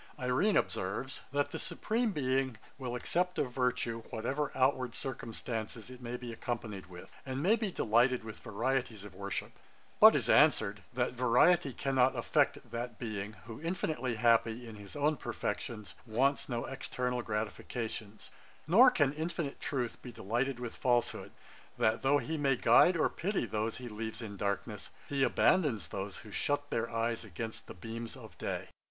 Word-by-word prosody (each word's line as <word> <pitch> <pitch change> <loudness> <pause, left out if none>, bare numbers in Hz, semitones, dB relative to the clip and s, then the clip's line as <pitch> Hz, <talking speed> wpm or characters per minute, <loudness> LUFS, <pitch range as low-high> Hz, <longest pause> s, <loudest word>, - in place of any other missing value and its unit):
IRENE 130 +11 +2
observes, 105 +8 -2
'That 145 0 0
the - - -4
Supreme 230 +1 0
Being 130 - 0 0.2
will 125 -2 -3
accept 180 +8 0
of 125 - 0
virtue, 125 -2 0
whatever 140 +6 -2
outward 130 -2 +2
circumstances 115 -2 -4
it 125 0 -11
may 120 0 -4
be 120 -2 -7
accompanied 110 -5 -4
with, 90 -1 -11
and 135 +1 -3
may 205 +6 +5
be 215 -4 -2
delighted 120 -1 +3
with 110 -1 -8
varieties 120 -1 -1
of 105 - -10
worship: 100 +1 -4 0.5
but - - +10
is - - +1
answered, 100 0 +4
that 125 0 0
variety 130 +6 +4
cannot 130 0 +2
affect - - +1
that 120 -1 -4
Being, 110 -3 -4
who, 115 +3 -8
infinitely 155 -8 -1
happy 115 +1 +3
in 110 -2 -9
his 100 -1 -10
own 150 +1 +2
perfections, 105 -4 -4
wants 135 +7 +1
no 120 -2 -2
external 125 -2 -2
gratifications; 110 0 -4 0.3
nor 225 +11 +8
can 145 - +2
infinite 160 -1 -3
truth 125 -5 -2
be 125 - -8
delighted 120 +5 -1
with 120 -2 -5
falsehood; 120 -2 +1 0.5
that 110 +1 +2
though 140 +2 +4
he 160 +2 -2
may 135 -2 +3
guide 170 +7 +6
or - - +4
pity 190 - -1
those 110 +1 -2
he 125 - -7
leaves 110 +1 -5
in 110 -4 -6
darkness, 100 +2 -3 0.2
he 140 -1 -1
abandons 135 - +3
those 95 0 -4
who 105 - -10
shut 145 +5 -1
their 115 0 0
eyes 115 0 -1
against 110 +2 -6
the - - -9
beams 115 +4 -6
of - - -12
day.' - - -3
125 Hz, 160 wpm, -32 LUFS, 110-135 Hz, 0.5 s, but